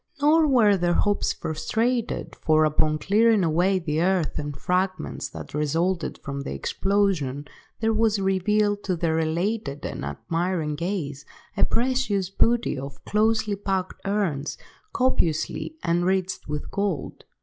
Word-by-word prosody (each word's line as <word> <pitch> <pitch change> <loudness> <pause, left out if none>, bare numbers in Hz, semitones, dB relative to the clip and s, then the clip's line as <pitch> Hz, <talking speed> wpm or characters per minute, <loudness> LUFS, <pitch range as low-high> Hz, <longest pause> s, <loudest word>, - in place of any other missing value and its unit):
Nor 305 +2 +5
were 220 -7 +5
their 175 -1 +1
hopes 205 0 +1
frustrated, 225 +9 -2
for, 155 0 +3
upon 155 0 +2
clearing 215 +5 +3
away 175 +4 +2
the 160 -3 -1
earth 180 -4 +1
and 145 -2 -5
fragments 185 +5 -1
that - - -9
resulted 165 +4 0
from 140 0 -4
the - - -5
explosion, 185 -9 0 0.4
there 225 0 +2
was 220 -1 +2
revealed 205 +2 +1
to 185 - 0
their 160 -1 0
elated 160 -1 -1
and - - -5
admiring 165 - -2
gaze, 150 -4 -3 0.3
a - - +3
precious 230 -6 0
booty 230 - +2
of 140 +1 -9
closely 215 0 +2
packed 195 -2 -3
urns 195 -8 -1 0.3
copiously 250 - 0
enriched 180 +2 0
with 150 0 -4
gold. 200 -7 -2
185 Hz, 130 wpm, -25 LUFS, 155-210 Hz, 0.4 s, Nor